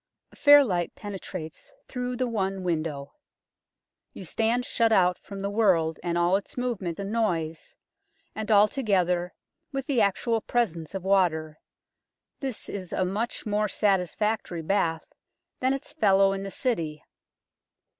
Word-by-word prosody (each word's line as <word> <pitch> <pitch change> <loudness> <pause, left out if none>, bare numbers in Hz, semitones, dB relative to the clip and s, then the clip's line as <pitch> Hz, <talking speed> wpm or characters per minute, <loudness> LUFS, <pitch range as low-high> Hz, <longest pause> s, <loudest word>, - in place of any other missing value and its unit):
A - - -18
fair 290 -1 +8
light 180 -8 -2
penetrates 185 - -7 0.2
through 250 -1 -3
the 255 +1 0
one 195 -5 -2
window. 155 -5 -2 1.0
You 190 - -8
stand 230 +7 0
shut 230 -1 +1
out 180 -4 +3
from 195 -1 -9
the 200 - -1
world 180 -7 +2
and 170 0 -1
all 175 +2 +3
its 200 - -10
movement 215 -9 -2
and 200 +1 -4
noise, 165 -8 -2 0.6
and 220 0 -5
altogether, 200 -5 +3 0.4
with 270 -1 -3
the 265 -4 +1
actual 225 +3 +1
presence 190 -10 -1
of 190 - -4
water, 160 -5 +1 0.8
this 265 -5 -5
is 185 -3 -6
a 185 - 0
much 210 +8 -3
more 210 0 +1
satisfactory 195 -2 0
bath 165 -2 0 0.5
than 260 +1 +2
its 275 +2 -4
fellow 195 -8 +4
in 195 - -4
the 195 - -5
City. 165 - -2
195 Hz, 140 wpm, -27 LUFS, 175-225 Hz, 1.0 s, fair